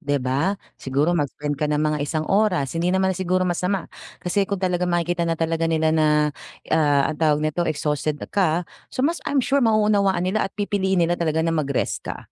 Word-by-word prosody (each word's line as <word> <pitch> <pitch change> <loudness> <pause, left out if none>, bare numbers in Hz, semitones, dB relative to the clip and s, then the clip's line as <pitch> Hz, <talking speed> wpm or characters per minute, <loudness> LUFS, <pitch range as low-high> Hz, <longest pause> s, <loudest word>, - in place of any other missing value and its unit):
'di 145 -4 0
ba 140 +10 0 0.2
siguro 140 +6 +1
mag-spend 145 -2 -2
ka 150 - +1
ng 150 - +1
mga 150 0 +1
isang 155 +2 -2
oras 195 -9 +1
hindi 170 +2 0
naman 190 +1 +2
siguro 185 0 0
masama 180 +2 -1 0.3
kasi 195 +2 -1
kung 200 - -1
talagang 180 -1 0
makikita 175 0 0
na 165 - 0
talaga 165 0 0
nila 160 -1 +2
na, 155 -1 +3 0.7
ah, 145 -2 +3
ang 150 - -12
tawag 150 -2 +3
nito 170 +3 0
exhausted 150 0 -1 0.2
ka. 175 -3 +1 0.2
So 260 - -2
mas 335 +3 0
I'm 275 -3 +1
sure 280 +1 +2
mauunawaan 210 -5 +2
nila 195 +2 0
at - - -45
pipiliin 190 -3 +1
nila 170 - 0
talaga 160 -1 +1
na 165 - +1
mag-rest 145 -4 -1
ka, - - -6
170 Hz, 195 wpm, -23 LUFS, 155-190 Hz, 0.7 s, na